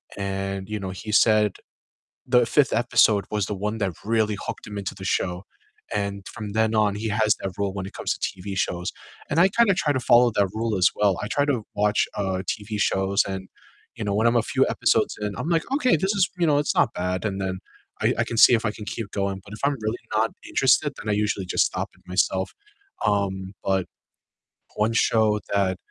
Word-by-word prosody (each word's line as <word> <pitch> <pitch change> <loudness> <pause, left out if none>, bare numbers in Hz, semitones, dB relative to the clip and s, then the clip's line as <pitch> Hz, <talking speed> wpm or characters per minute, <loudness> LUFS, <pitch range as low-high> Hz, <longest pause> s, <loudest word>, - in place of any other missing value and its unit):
and, 95 0 -4
you 105 0 -3
know, 95 -1 -5
he 100 +3 -7
said 105 -2 +4 0.7
the 125 -1 +4
5th 145 +2 +3
episode 110 -3 +3
was 105 -3 0
the 105 - -3
one 105 +3 -3
that 100 -4 -1
really 110 -1 +1
hooked - - -5
him 105 -1 -5
into 95 - -5
the 95 - -9
show, 90 0 -1 0.5
and 100 -1 -3
from 105 -2 -7
then 110 0 +2
on, 105 -2 +2
he 110 +1 -3
has 110 0 +2
that 95 -2 -4
rule 100 -1 -1
when 95 -1 -4
it - - -9
comes - - -2
to - - -34 0.2
TV 100 0 -5
shows, 90 -1 -1 0.4
and 150 - +1
I 185 +3 +6
kinda 210 -1 +3
try 150 -5 +1
to 130 - 0
follow 120 -1 +5
that 100 -1 +3
rule 110 -1 -1
as 90 -1 +5
well, 100 -3 +2
I - - -3
try 145 +5 +1
to 135 -6 0
watch, 105 0 +2
uh, 95 -2 -1
TV 105 0 -3
shows 95 0 +2
and, 95 -1 -5 0.5
you - - -5
know, 100 - 0
when 110 +2 +3
I'm 120 - +2
a 115 - +2
few - - +2
episodes - - +1
in, 105 -1 -3
I'm 160 - -3
like, 165 -2 +2
"Okay, 255 - +3
this 190 +6 0
is, 190 -2 +2
you 170 - +3
know, 145 -1 +4
it's 145 - -1
not 120 - +3
bad," 90 +1 -2
and 100 -2 -2
then, 95 -1 -3 0.4
I - - +3
I - - +4
can 115 - -5
see 120 - +8
if 115 - +2
I 105 - +1
can 105 0 -9
keep 105 +1 -5
going, 100 -1 -2
but 100 - -14
if 105 - -9
I'm 145 - +2
really 110 +3 -2 0.2
not 110 +1 +2 0.2
interested, 135 +3 +3
then 105 - -6
I - - +2
usually 105 -2 0
just - - +2
stop - - -4
it - - -25
myself, 95 +1 0 0.5
um, 95 -2 -1
but 95 -2 +1 0.9
one 105 +2 +1
show 110 -2 +3
that 95 -2 +1
105 Hz, 225 wpm, -24 LUFS, 95-115 Hz, 0.9 s, see